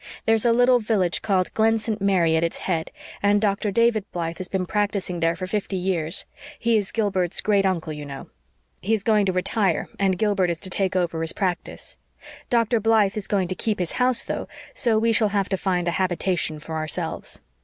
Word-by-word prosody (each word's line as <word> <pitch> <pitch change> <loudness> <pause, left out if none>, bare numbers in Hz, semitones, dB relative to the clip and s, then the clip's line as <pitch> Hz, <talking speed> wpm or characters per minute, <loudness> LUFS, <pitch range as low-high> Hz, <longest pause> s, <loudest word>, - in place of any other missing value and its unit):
There's 225 +1 +2
a 235 - +5
little 245 +1 +5
village 210 -6 0
called 190 -3 0
Glen 225 +1 +3
St. 215 -1 -3
Mary 180 -5 +3
at 160 - +2
its 170 - -1
head, 165 -4 -2 0.3
and 205 +1 +3
Dr. 205 0 0
David 230 0 +2
Blythe 165 -1 -4
has 185 - -4
been 190 -1 -2
practicing 200 -3 -1
there 165 0 +1
for 185 - -5
fifty 195 +1 -2
years. 180 -3 -1 0.3
He 235 0 +1
is 205 -3 0
Gilbert's 190 -6 0
great 200 -2 +2
uncle, 165 -4 -2
you 150 -1 -7
know. 140 -1 -8 0.5
He 225 +3 +1
is 205 - -5
going 210 -3 +3
to - - +2
retire, 185 0 0
and 190 -2 +2
Gilbert 200 -4 +1
is 170 -1 -2
to 185 - -7
take 190 0 0
over 170 -3 0
his 165 0 +1
practice. 185 -3 -4 0.5
Dr. 235 -1 +2
Blythe 215 -2 +3
is 205 -2 -3
going 195 -3 +1
to - - 0
keep 215 +3 -1
his 180 -2 -2
house, 250 -1 +2
though, - - -4 0.3
so 235 -5 +1
we 230 +1 +2
shall 215 -1 +4
have 200 -1 0
to 195 - +1
find 180 -2 -1
a - - +2
habitation 180 -3 -1
for 160 +2 -8
ourselves. 155 -1 -3
195 Hz, 205 wpm, -24 LUFS, 180-215 Hz, 0.5 s, a